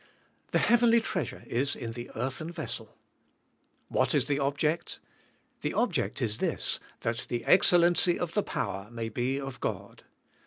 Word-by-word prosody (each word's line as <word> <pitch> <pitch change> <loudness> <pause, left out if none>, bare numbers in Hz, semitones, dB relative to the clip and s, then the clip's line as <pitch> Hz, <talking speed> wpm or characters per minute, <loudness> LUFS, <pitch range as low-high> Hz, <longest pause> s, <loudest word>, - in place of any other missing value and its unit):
The - - +2
heavenly 235 0 +5
treasure 185 - -3
is 135 +4 0
in 115 - -5
the 120 +1 -7
earthen 130 +7 -3
vessel. 120 -9 -5 0.9
What - - +1
is 140 -3 +3
the 145 0 0
ob 140 +1 0
ject? 155 +3 0 0.6
The - - -2
object - - 0
is 110 -1 -1
this, - - 0 0.2
that 115 +1 -2
the 120 -2 -2
excellency 175 -1 +5
of 175 -2 -3
the 210 - +2
power 95 - -4
may 115 -1 -4
be 125 +5 -1
of 135 -2 -6
God. - - -4
135 Hz, 155 wpm, -29 LUFS, 120-170 Hz, 0.9 s, heavenly